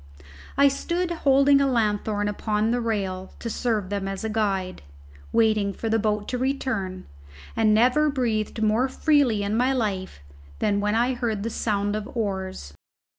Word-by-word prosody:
I 280 0 +6
stood 340 +6 -1
holding 280 -3 +4
a 275 - +3
lanthorn 210 -3 0
upon 210 +1 0
the 245 0 0
rail 195 -5 -3
to 230 - -5
serve 215 -6 -1
them 200 -1 -2
as 195 +2 -4
a 220 - -2
guide, 195 -4 -1 0.5
waiting 215 -3 +2
for 225 - -4
the 225 +1 +2
boat 210 -1 -1
to 250 - -2
return, 250 -8 -2 0.5
and 220 -1 +3
never 250 +8 +4
breathed 225 -5 -1
more 220 +5 +2
freely 265 -8 +2
in 200 +2 -1
my 250 +3 +2
life 200 - -2 0.4
than 200 - +1
when 210 +1 0
I 240 +3 +2
heard 230 -5 -2
the 230 - -3
sound 205 -2 -1
of 215 0 -4
oars. 190 - -3
220 Hz, 165 wpm, -24 LUFS, 205-250 Hz, 0.5 s, I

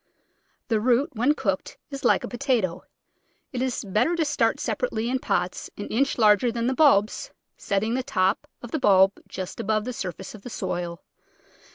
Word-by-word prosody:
The 225 -2 +2
root 255 +7 +2
when 250 +6 +2
cooked 195 -8 -2
is 275 -1 -6
like - - +3
a - - -3
potato. 240 - 0 0.7
It 250 - -2
is 255 -3 -2
better 215 - +1
to 330 -2 +1
start 295 - +1
sepa - - -1
rately 230 - -2
in 260 - +1
pots 180 -7 -2
an 205 - -6
inch 270 +5 +1
larger 215 +1 +4
than 230 0 -2
the 260 - +1
bulbs, 255 -8 +3 0.3
setting 205 +3 -1
the 260 - 0
top 195 -6 0 0.2
of 240 - -8
the 315 - -1
bulb 195 -4 +5
just 185 -1 -6
above 215 +1 0
the 250 - -3
surface 190 -3 -6
of 215 - -11
the 245 - -8
soil. 175 -5 -4
225 Hz, 185 wpm, -25 LUFS, 195-260 Hz, 0.7 s, bulb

